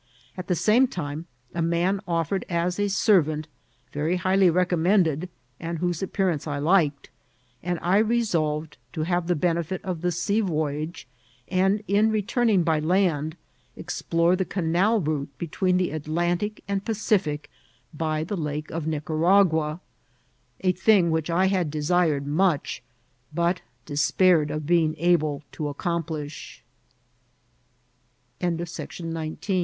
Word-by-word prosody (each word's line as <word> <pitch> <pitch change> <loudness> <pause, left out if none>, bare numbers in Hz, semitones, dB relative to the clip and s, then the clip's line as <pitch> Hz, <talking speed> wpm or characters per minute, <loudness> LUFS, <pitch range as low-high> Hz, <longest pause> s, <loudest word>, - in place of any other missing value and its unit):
At 185 -1 -7
the 180 - +1
same 230 +9 +4
time, 160 - -5 0.3
a 170 - -2
man 170 +4 +1
offered 170 +2 0
as 175 +2 -1
a 205 0 +1
servant, 155 -7 +2 0.5
very 155 +4 0
highly 185 +1 +3
recommended, 180 -1 +2 0.3
and 170 0 -4
whose 175 0 -1
appearance 185 -5 -1
I 145 -1 -2
liked; 150 -2 +1 0.5
and 175 0 -2
I 185 +4 +4
re 235 +2 +2
solved 155 - -1 0.2
to 155 - -2
have 175 +1 0
the 175 - +2
benefit 170 +2 -1
of 180 -4 -3
the 180 0 +1
sea 200 +5 0
voyage, 155 -4 -2 0.4
and, 195 +3 +2
in 205 +3 +3
re 215 -1 0
turning 225 -4 +2
by 160 -2 +2
land, 160 -2 +1 0.4
explore 170 +2 0
the 190 - 0
canal 185 +5 +1
route 150 -5 -2
between 180 +4 0
the 180 -1 0
At 155 -1 -5
lantic 175 +6 -1
and 200 -1 -1
Pacific 195 -9 0 0.5
by 155 0 -1
the 190 +6 -3
Lake 150 -3 -4
of 160 -1 -3
Nicaragua, 160 +1 +2 0.8
a 185 - +3
thing 185 -2 +3
which 160 0 -1
I 175 +3 +3
had 185 -4 +1
desired 155 -1 +1
much, 160 +1 0 0.5
but 170 +2 +1 0.2
despaired 150 +2 +3
of 155 0 -3
being 160 -1 +2
able 155 -4 +1
to 150 -2 -3
170 Hz, 130 wpm, -25 LUFS, 155-190 Hz, 0.8 s, same